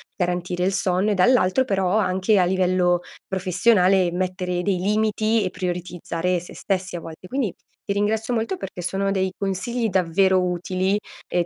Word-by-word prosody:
garantire 180 0 -1
il 190 - +2
sonno 190 +2 +1
e - - +3
dall'altro 245 +3 +3
però 195 -2 +1
anche 190 +1 +2
a 180 - +4
livello 180 -1 +2 0.3
professionale, 185 0 +3
mettere 180 0 -2
dei 190 0 0
limiti 215 +2 +1
e 185 - -1
prioritizzare 180 -1 -2
sé 175 - -12
stessi 190 -2 -2
a - - -3
vol 165 - -8
Quindi 255 -5 -1 0.3
ti 200 - -2
ringrazio 220 +4 0
molto 230 +11 -1
perché 180 - -7
sono 195 +3 -1
dei 190 -1 0
consigli 220 +5 -2
davvero 185 +1 +3
utili, 185 +2 0 0.3
e 175 -1 0
185 Hz, 155 wpm, -23 LUFS, 180-205 Hz, 0.3 s, a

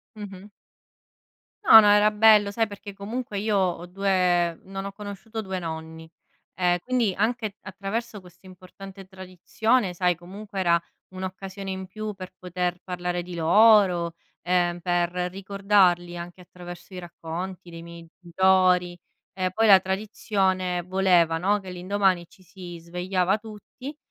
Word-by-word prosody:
Mh-mh. 205 -1 -10 1.2
No, 225 - +11
no, 210 - +5
era 205 +1 +5
bello, 210 -1 +5
sai, 225 +2 0
perché, 205 0 -10
comunque, 210 +3 -5
io 210 +1 0
ho 180 -2 0
2 180 -2 +1
non 195 0 -6
ho 200 - -5
conosciuto 210 +2 -7
2 190 -3 -4
nonni, 160 -1 -7 0.5
ehm 180 -1 +2
quindi, 245 -6 +1
anche 220 0 -1
attraverso 205 +3 -5
questa 180 0 -19
importante 190 +1 -12
tradizione, 190 +4 -1
sai, 180 0 +1
comunque, 195 +3 -8
era 170 -2 +3 0.4
un'occasione 190 +1 -6
in 190 0 -6
più 215 +2 -6
per 185 -1 -9
poter 180 0 -3
parlare 180 -1 -3
di 180 +1 -9
loro, 180 0 +4 0.3
ehm, 175 0 0
per 175 -1 0 0.2
ricordarli 190 -2 +1
anche 175 +1 -9
attraverso 175 0 -12
i - - -5
racconti 175 +1 -7
dei 165 -1 -9
miei 170 0 -11
genitori. 180 0 +2 0.3
E 185 -1 -2
poi 225 +4 +1
la 195 -2 +9
tradizione 190 -2 -1
voleva, 180 -3 +2
no, 200 +5 +1
che 190 - -10
l'indomani 185 0 0
ci 185 +2 -22
si 180 -1 -10
svegliava 180 +3 -1
tutti 225 +6 -10
185 Hz, 140 wpm, -25 LUFS, 175-200 Hz, 1.2 s, No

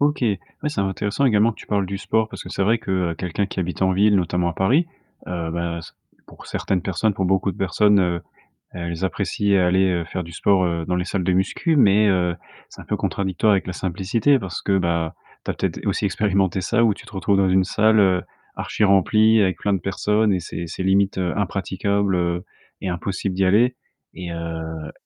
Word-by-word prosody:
OK, 145 0 +2
oui, 105 -5 +1 0.3
c'est 150 -9 -1
intéressant 100 +6 -1
également 110 -2 +4
que - - -21
tu - - -12
parles 100 -2 0
du 100 +1 -4
sport, 110 +2 0
parce - - -8
que - - -10
c'est - - -2
vrai 115 +3 +3
que, 100 - -7 0.2
heu, - - -7
quelqu'un 90 +3 -2
qui 95 - -4
habite 90 +1 -4
en 95 0 +3
ville, 100 +2 +4
notamment 90 -1 0
à - - -5
Paris, 130 - +2 0.4
heu, 85 -2 -3
beh, 85 0 -3
s 80 - -11 0.3
pour - - -14
certaines 95 -2 -1
personnes, 100 +3 0
pour 95 -1 -1
beaucoup 95 +1 +1
de - - -14
personnes, 100 +2 +3
heu, 85 -2 0 0.5
elles 85 0 -5
apprécient 100 +3 0
aller, 95 +2 +3
heu, 85 -2 0
faire 90 +1 -4
du 85 - -11
sport, 95 +3 +2
heu, 85 -1 -2
dans 90 - -1
les 90 - -1
salles 95 -3 -2
de 95 - +1
muscu 95 - 0
mais 105 -3 +5
heu, 90 -3 +1 0.3
c'est - - -12
un - - -13
peu - - -2
contradictoire 100 +2 0
avec 95 - 0
la 90 - -3
simplicité, 95 +10 +1
parce 95 -6 -5
que, 95 -1 +1
bah, 85 -3 -1 0.3
tu - - -2
as - - -6
peut-être - - -3
aussi - - 0
expérimenté 95 -3 +1
ça, 115 +5 +1
où 110 - +4
tu - - -14
te - - -13
retrouves 95 +1 +1
dans 95 -1 +3
une 95 0 +4
salle, 110 +3 +3
heu, 95 -3 +3 0.3
archi-remplie 110 +2 +3
avec 95 -4 +1
plein 100 - 0
de 95 - 0
personnes 105 +2 +1
et 90 - 0
c'est 85 0 -6
c'est 85 +3 -5
limite, 95 +1 +2
heu, 90 -2 -1
impraticable, 100 0 -1
heu, 85 0 -1 0.4
et 95 - -3
impossible 90 +2 -3
d'y 95 - +1
aller 120 +7 +3 0.4
et 90 -2 -7
heu, 80 -1 -5
95 Hz, 220 wpm, -22 LUFS, 90-105 Hz, 0.5 s, mais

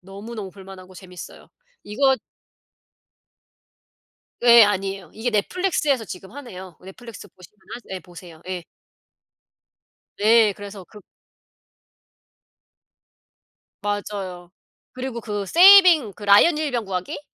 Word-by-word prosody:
너무너무 200 +2 -9
볼 190 +1 -15
만하고 185 -1 -13
재밌어요. 180 -1 -12 0.4
이거 265 +6 +1 2.3
예 235 -1 +8
아니에요. 195 -3 -3
이게 225 +3 -3
넷플릭스에서 280 - -1
지금 190 +1 -10
하네요. 190 - -11
넷플릭스 210 +4 -12
보시면 185 +3 -20 0.2
하세 230 -5 -9
예 - - -6
보세요. 175 -2 -15
예. 185 -2 -5 1.5
네 220 0 +4
그래서 200 -1 -10
그 210 - -15 2.8
맞아요. 195 -4 -5 0.4
그리고 255 -2 -6
그 205 -1 -4
saving 345 - +6
그 205 - -13
라이언 205 +11 +5
일병 265 -7 -3
구하기? 185 -2 -5
205 Hz, 255 characters per minute, -22 LUFS, 190-235 Hz, 2.8 s, 예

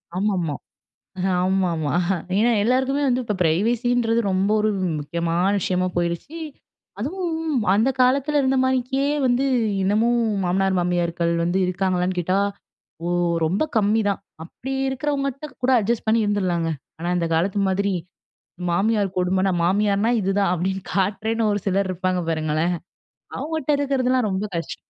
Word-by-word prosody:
ஆமாமா 185 -6 0 0.9
ஆமாமா. 180 -5 0 0.5
ஏனா, 235 +3 +4
எல்லாருக்குமே 265 +4 +1
வந்து 255 0 +1
இப்போ 210 - -2
பிரைவசின்றது 230 +7 +1
ரொம்ப 190 +2 +1
ஒரு 215 - +2
வ் - - -2 0.2
முக்கியமான 170 +5 0
விஷயமா 185 +1 0
போயிருச்சு. 170 - -2 0.6
அதுவும் 325 - -2 0.2
அந்த 225 +6 +3
காலத்தில 275 +4 +3
இருந்தமானிக்கே 260 +1 +1 0.2
வந்து 250 +2 +2 0.4
இன்னமும் 225 +5 +2 0.2
மாமனார், 190 +1 +1
மாமியார்கள் 175 -1 0
வந்து 175 +2 +1
இருக்காங்களான்னு 185 0 0
கேட்டா, 185 +3 +1 0.7
ஓ - - -1 0.4
ரொம்ப 185 - 0
கம்மிதான். 205 -1 +2 0.2
அப்படி 260 +10 -7 0.2
இருக்கிறவங்ககிட்ட 275 +1 -2 0.2
கூட 260 - +3
அட்ஜஸ்ட் 225 +2 -1
பண்ணி 225 +1 +3
இருந்துருலாங்க. 180 -5 0 0.3
ஆனா, 170 +2 -2
இந்த 170 -1 -1
காலத்து 190 +5 +1
மாதிரி 200 +1 0 0.8
மாமியார் 200 +1 +1
கொடுமனா, 185 +1 +1
"மாமியார்னா 205 +3 +2
இதுதான்." 195 -1 +1
அப்படீன்னு 190 +2 -2
காட்டுறேன்னு 215 +3 0
ஒரு 205 - -1
சிலர் 195 0 +1
இருப்பாங்க 185 0 -1
பாருங்களேன். 155 +2 0 0.7
அவங்கட்ட 315 -2 -4
இருக்கிறதுலாம் 255 -4 +1
ரொம்ப 190 +2 -1
கஷ் 165 - -3
200 Hz, 125 wpm, -22 LUFS, 180-245 Hz, 0.9 s, ஏனா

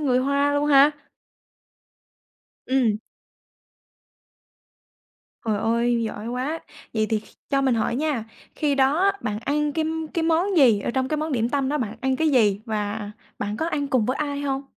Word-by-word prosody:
người 255 -4 +2
Hoa 280 +2 +2
luôn 290 0 +1
ha? 285 0 +7 1.8
Ừm. 250 -5 +2 2.5
Trời 220 -2 0
ơi, 235 +2 +1
giỏi 220 0 -4
quá. 260 +7 -2 0.3
Vậy 215 -1 +1
thì 220 - +2
kh - - -20 0.3
cho 275 -1 +3
mình 260 -2 +3
hỏi 230 +1 0
nha, 290 -6 -1 0.3
khi 295 -2 +1
đó 295 +9 +3
bạn 210 0 -2
ăn 295 +5 -1
cái 315 +1 0 0.3
cái 335 - 0
món 335 +4 +1
gì? 240 -8 +5
Ở - - -2
trong 260 +1 -1
cái 305 - 0
món 310 0 -2
điểm 235 -1 +1
tâm 275 -1 0
đó 300 +1 0
bạn 225 -2 -3
ăn 265 -1 0
cái 320 +3 +2
gì 215 -8 +3
và 210 -2 -3 0.3
bạn 205 +1 -3
có 320 - -1
ăn 290 -3 -1
cùng 250 -6 +2
với 255 - 0
ai 285 -1 -2
hông? 275 -1 -2
265 Hz, 175 wpm, -24 LUFS, 225-290 Hz, 2.5 s, ha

